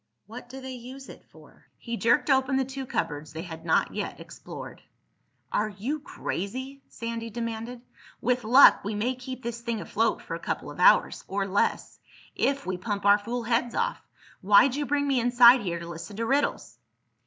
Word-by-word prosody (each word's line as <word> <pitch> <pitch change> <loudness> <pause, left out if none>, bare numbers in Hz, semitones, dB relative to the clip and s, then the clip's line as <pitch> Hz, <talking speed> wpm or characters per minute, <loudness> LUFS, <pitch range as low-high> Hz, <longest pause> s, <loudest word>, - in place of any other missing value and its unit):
"What 240 +4 -10
do 265 +2 -8
they 265 0 -7
use 255 +2 -10
it - - -12
for?" - - -19
He 235 -1 -5
jerked 235 +5 +2
open 265 0 +2
the 265 - +1
two 265 0 -7
cupboards 150 -5 -3
they 160 +1 -5
had 165 -3 -9
not 165 - +1
yet - - -4
explored. - - -10 0.7
"Are 215 +1 0
you 225 +10 -4
crazy?" 260 +2 -5
Sandy 230 0 -5
demanded. 230 +1 -5 0.4
"With 250 0 0
luck 250 +6 +7
we 205 +2 -3
may 230 +5 0
keep 255 0 -8
this 235 0 -5
thing 235 -1 -3
afloat 225 +2 -1
for - - -7
a - - -4
couple - - -4
of - - -12
hours—or 195 0 +3
less—if 270 +7 -2
we 185 -1 -2
pump 205 +1 -4
our 205 +1 +6
fool 235 +3 -4
heads 235 +1 0
off. - - -1 0.4
Why'd 205 +7 +5
you 290 +1 -2
bring 285 0 +1
me 270 -2 +2
inside 245 +1 +6
here 175 -3 -3
to 170 0 -8
listen 170 +4 -8
to 230 - -1
riddles?" 275 +4 -1
235 Hz, 180 wpm, -27 LUFS, 205-260 Hz, 0.7 s, luck